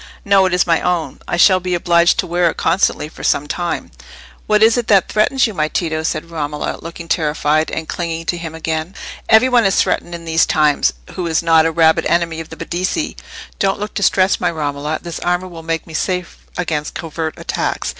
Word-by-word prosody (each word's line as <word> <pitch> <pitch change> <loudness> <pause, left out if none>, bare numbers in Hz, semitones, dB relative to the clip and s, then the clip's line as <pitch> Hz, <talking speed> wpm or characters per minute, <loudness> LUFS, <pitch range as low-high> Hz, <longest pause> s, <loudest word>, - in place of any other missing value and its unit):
"No; 195 -1 +4
it 185 - -2
is 180 - +2
my 165 -1 +2
own. 175 -2 -1
I - - -1
shall 185 +1 +6
be 180 0 -2
obliged 170 0 +3
to - - 0
wear 175 0 +1
it - - -6
constantly, 165 -3 +1
for 155 - -12
some 145 - +1
time." 175 +3 -3 0.6
"What 215 0 +4
is 225 +1 +5
it 240 -2 -1
that 195 -3 +4
threatens 245 +5 +2
you, 220 - -3
my 155 -4 0
Tito?" 160 -1 -2
said 160 +1 -3
Romola, 150 -2 -3
looking 165 0 -8
terrified, 155 -1 +1
and 160 - -4
clinging 165 -1 -4
to 175 - -1
him 165 -1 -6
again. 160 +2 -3 0.3
"Every 220 +3 +6
one 245 -2 +4
is 195 -2 +2
threatened 175 - 0
in 170 0 -9
these 165 0 +2
times, 150 -2 +2 0.2
who 180 -2 -3
is 165 0 0
not 165 -1 +4
a - - -1
rabid 160 0 +3
enemy 170 -1 0
of 165 - -8
the - - -10
Medici. 185 - -2 0.4
Don't 195 +1 +1
look 210 +1 -5
distressed, 190 -1 +2
my - - +2
Romola—this 155 +2 -4
armour 180 +1 -1
will 170 -2 -10
make 165 0 -3
me 165 - -12
safe 180 +2 -3
against 155 -4 -2
covert 160 -1 -4
attacks." - - -2
170 Hz, 205 wpm, -17 LUFS, 160-185 Hz, 0.6 s, shall